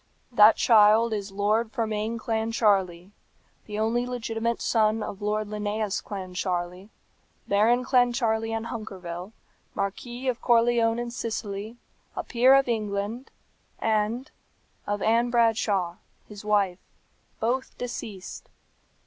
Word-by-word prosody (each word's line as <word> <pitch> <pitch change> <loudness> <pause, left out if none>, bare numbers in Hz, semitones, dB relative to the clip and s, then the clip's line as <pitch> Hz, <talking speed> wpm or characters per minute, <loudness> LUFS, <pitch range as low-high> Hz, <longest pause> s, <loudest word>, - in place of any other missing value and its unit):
"That 220 -2 +7
child 220 0 +5
is 205 -1 -4
Lord 210 +3 0
Fermain 220 0 -2
Clancharlie, 210 -5 0 0.6
the 210 -1 -5
only 230 +3 0
legitimate 235 -1 -2
son 220 -1 +1
of 200 - -7
Lord 210 +1 -1
Linnæus 210 -1 -2
Clancharlie, 185 -1 -4 0.6
Baron 230 +5 +3
Clancharlie 240 -3 +2
and 225 0 -3
Hunkerville, 190 -5 -7 0.4
Marquis 240 +6 -4
of 250 -2 -1
Corleone 230 -1 +3
in 240 0 -4
Sicily, 220 -1 -5 0.4
a - - -3
peer 255 +2 +5
of 275 -1 +3
England, 215 +2 -2 0.5
and 225 +5 -1 0.6
of 205 -1 -2
Ann 235 +2 +3
Bradshaw, 215 -7 +1 0.3
his 210 -1 -10
wife, 200 -3 +1 0.6
both 250 +4 -2
deceased. 220 -6 -7
220 Hz, 110 wpm, -26 LUFS, 205-235 Hz, 0.6 s, That